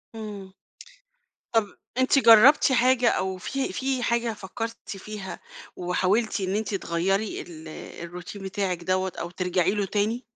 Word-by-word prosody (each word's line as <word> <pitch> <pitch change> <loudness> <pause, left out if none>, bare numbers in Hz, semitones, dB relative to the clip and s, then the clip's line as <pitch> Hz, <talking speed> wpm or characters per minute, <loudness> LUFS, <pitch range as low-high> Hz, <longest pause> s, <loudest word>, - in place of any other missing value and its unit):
امم، 205 -3 -7 1.0
طب 225 -2 +3 0.3
أنتِ 260 +2 +4
جربتِ 245 +4 +7
حاجة 250 0 +4
أو 190 -2 0
في 270 +9 -3
في 265 -1 -1
حاجة 235 -1 +1
فكرتِ 225 +3 -5 0.2
فيها 200 0 -7 0.4
وحاولتِ 190 +5 +1
إن 190 0 -1
أنت 215 -1 -2
تغَيري 195 +3 -1
ال 160 -2 -10 0.4
الروتين 180 +3 -8
بتاعِك 190 -2 -2
دوَّة 185 +1 0
أو 170 - -4
ترجعي 180 0 +1
له 205 0 0
تاني؟ 215 +5 -1
205 Hz, 135 wpm, -26 LUFS, 185-230 Hz, 1.0 s, جربتِ